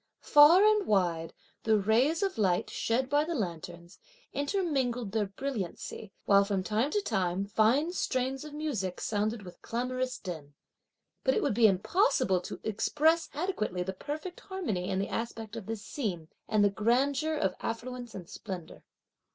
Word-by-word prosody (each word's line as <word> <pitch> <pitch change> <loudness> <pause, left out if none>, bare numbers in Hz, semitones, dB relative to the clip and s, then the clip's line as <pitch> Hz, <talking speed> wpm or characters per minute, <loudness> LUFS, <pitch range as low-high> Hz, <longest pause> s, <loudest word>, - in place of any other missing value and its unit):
Far 320 +7 +7
and 425 -2 +3
wide, 170 -5 +1 0.3
the 220 -1 +3
rays 240 - +2
of 385 - -1
light, 185 -4 +1
shed 250 +3 0
by 290 +2 +3
the 335 +2 -3
lanterns, 170 - -5 0.3
intermingled 275 - -1
their 215 -1 0
brilliancy, 205 -3 -5
while, 200 0 +6
from 200 -2 -1
time 220 +7 0
to 415 +7 0
time, 185 - 0
fine 230 +11 +2
strains 260 -4 -1
of 305 - -8
music 270 - -3
sounded 215 +1 -1
with 180 -2 -12
clamorous 255 +2 -2
din. 155 -6 -8 0.7
But 260 - +2
it - - +1
would - - +1
be 225 +1 +6
impossible 195 - +2
to - - -7
express 305 +10 +2
adequately 215 - -1
the 190 +1 -4
perfect 305 - -6
harmony 270 - -3
in 190 - 0
the 195 - -1
aspect 225 -1 -4
of 225 -4 -7
this 225 -2 -5
scene, 180 - -4 0.2
and 215 -1 +3
the 200 - +3
grandeur 270 +9 +1
of 300 - 0
affluence 245 0 -5
and 180 -3 -8
splendour. 185 -5 -8
225 Hz, 160 wpm, -30 LUFS, 195-290 Hz, 0.7 s, Far